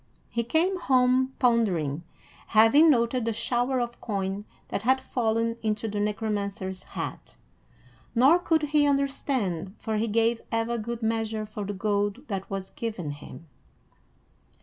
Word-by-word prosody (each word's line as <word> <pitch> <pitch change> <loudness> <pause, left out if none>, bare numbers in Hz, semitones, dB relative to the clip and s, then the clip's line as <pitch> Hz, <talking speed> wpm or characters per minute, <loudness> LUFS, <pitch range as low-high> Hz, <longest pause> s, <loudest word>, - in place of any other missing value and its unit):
He 235 - 0
came 335 +10 +1
home 260 -2 +3
pondering, 185 - +1 0.5
having 225 +9 +6
noted 240 -2 +2
the 230 0 0
shower 245 +3 0
of 240 -1 -4
coin 200 -1 -3 0.2
that - - -2
had 260 +4 +3
fallen 230 -2 0
into 215 0 -1
the 210 -1 -3
Necromancer's 205 -3 -2
hat; - - -7 0.8
nor 270 +9 +6
could 325 -3 +1
he 295 0 +3
understand, 260 - -1
for 220 -1 -2
he 225 +2 0
gave 230 +2 +1
ever 230 +1 0
good 230 +1 -5
measure 220 -1 -1
for 210 -1 -6
the 205 - -3
gold 205 +6 -1
that 195 -2 -4
was 195 -1 -5
given 220 - -4
him. 145 +3 -10
225 Hz, 140 wpm, -27 LUFS, 205-255 Hz, 0.8 s, having